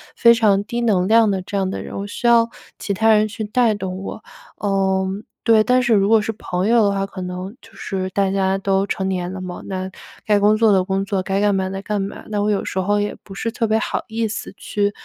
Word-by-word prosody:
非 235 0 +6
常 210 -4 +3
低 240 +3 -3
能 195 -6 +2
量 225 0 +5
的 190 -1 -1
这 200 - -7
样 190 -1 0
的 - - -4
人， - - -8
我 200 - -4
需 205 - -7
要 235 -1 +5 0.3
其 - - -4
他 220 +3 +3
人 215 0 +3
去 220 +1 -6
带 225 +1 +2
动 190 -2 -5
我。 - - -7 0.4
嗯， 195 0 0 0.2
对， 225 -2 +5
但 250 +2 +3
是 240 -2 +2
如 200 -1 +3
果 225 0 +6
是 220 - -2
朋 185 -3 -3
友 230 0 +4
的 200 - +3
话， 195 0 -1
可 195 -1 -8
能 180 +3 -6
就 225 - -17
是 190 -1 -4
大 195 0 0
家 190 0 +1
都 195 0 0
成 190 -1 -2
年 180 -1 -2
了 190 - -6
嘛， 180 -1 -6
那 190 0 -4 0.3
该 210 -1 +3
工 210 +1 +4
作 225 -1 +4
的 190 -2 +4
工 195 +1 -1
作， 195 -1 -1
该 195 +1 -1
干 205 0 +2
嘛 190 -1 -1
的 195 0 -5
干 210 -1 -2
嘛， 195 +1 -6
那 210 -1 -1
我 210 - +1
有 205 -2 0
时 190 - -3
候 205 +2 +1
也 205 0 -2
不 195 - -11
是 230 +3 -3
特 230 -1 -1
别 215 +1 +2
好 220 - -2
意 225 -1 -1
思 215 - -5
去 205 -1 -1
200 Hz, 275 characters per minute, -20 LUFS, 190-220 Hz, 0.4 s, 非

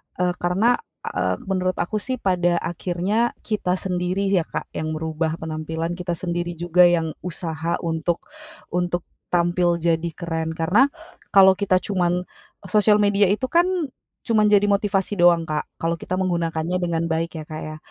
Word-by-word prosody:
eee, 180 0 +1
karena, 195 +8 +2 0.2
eee, - - -1
menurut 185 -2 -1
aku 210 +5 -2
sih 255 +5 -3
pada 180 -5 +1
akhirnya 185 +7 -1
kita 205 -5 0
sendiri 185 +1 -1
ya, 180 -5 +2
Kak, - - -5
yang 155 0 -3
merubah 160 0 -2
penampilan 160 +1 -4
kita 175 -1 -2
sendiri 175 0 -3
juga 175 +1 +4
yang 165 -2 +1
usaha 165 -1 -3
untuk 165 +1 -1 0.5
untuk 175 0 -1 0.3
tampil 175 0 +2
jadi 165 0 +1
keren. 160 -1 -3
Karena 180 +12 +4 0.4
kalau 190 -1 +7
kita 200 -2 +2
cuman 180 -2 0 0.5
sosial 210 0 +5
media 205 -1 +4
itu 215 +7 0
kan 345 +2 +4 0.5
cuman 220 -3 +2
jadi 205 -1 +4
motivasi 200 0 +1
doang, 170 -2 +4
Kak, 150 -1 -1 0.2
kalau 165 0 0
kita 180 - -6
menggunakannya 170 -2 0
dengan 165 -2 -1
baik 160 0 -2
ya, - - -7
Kak, 155 - -6
ya. 155 0 -7
175 Hz, 155 wpm, -23 LUFS, 165-195 Hz, 0.5 s, kalau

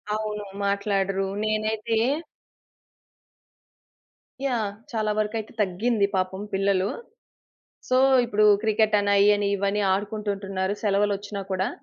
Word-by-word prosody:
అవును 210 -1 -3 0.2
మాట్లాడరు. 195 -1 0 0.2
నేనైతే 215 +1 -1 2.5
యాహ్! 225 -6 0 0.2
చాలా 215 -2 0
వరకయితే 215 0 -2
తగ్గింది 205 +3 +1
పాపం 190 +1 -1
పిల్లలు. 195 0 +1 1.0
సో 255 0 +3 0.3
ఇప్పుడు 215 -3 +2 0.2
క్రికెటని 215 -2 +2
అయ్యని 205 0 +4
ఇవ్వని 200 +1 0
ఆడుకుంటుంటుంన్నారు 200 -1 -2
సెలవులోచ్చినా 205 0 0
కూడా. 190 +1 0
205 Hz, 85 wpm, -25 LUFS, 195-215 Hz, 2.5 s, అయ్యని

